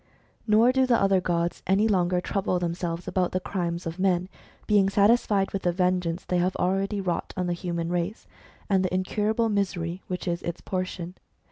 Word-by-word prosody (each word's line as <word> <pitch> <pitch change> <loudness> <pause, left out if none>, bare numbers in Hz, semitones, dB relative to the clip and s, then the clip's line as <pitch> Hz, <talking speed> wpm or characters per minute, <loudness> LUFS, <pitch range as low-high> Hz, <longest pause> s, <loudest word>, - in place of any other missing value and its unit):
Nor 220 +3 +5
do 260 0 +2
the 240 -2 +4
other 195 -1 +3
gods 170 -1 -1
any 195 +4 +3
longer 180 -3 +2
trouble 190 -1 -1
themselves 170 0 -3
about 185 -2 0
the 185 - +1
crimes 175 -2 -3
of 165 +2 -5
men, 185 -1 +1 0.4
being 200 -2 +4
satisfied 205 -1 +3
with 195 - -2
the 175 - +1
vengeance 180 -1 0
they 180 - 0
have 180 +2 0
already 195 +3 0
wrought 180 -3 -3
on 180 - 0
the 175 - 0
human 170 -1 -3
race, 175 +4 -2 0.4
and 195 -2 +2
the 185 - -1
incurable 210 +5 0
misery 185 -4 -1
which 180 -1 -4
is 170 0 -1
its 170 0 -4
portion. 185 -2 -4
185 Hz, 180 wpm, -26 LUFS, 175-195 Hz, 0.4 s, Nor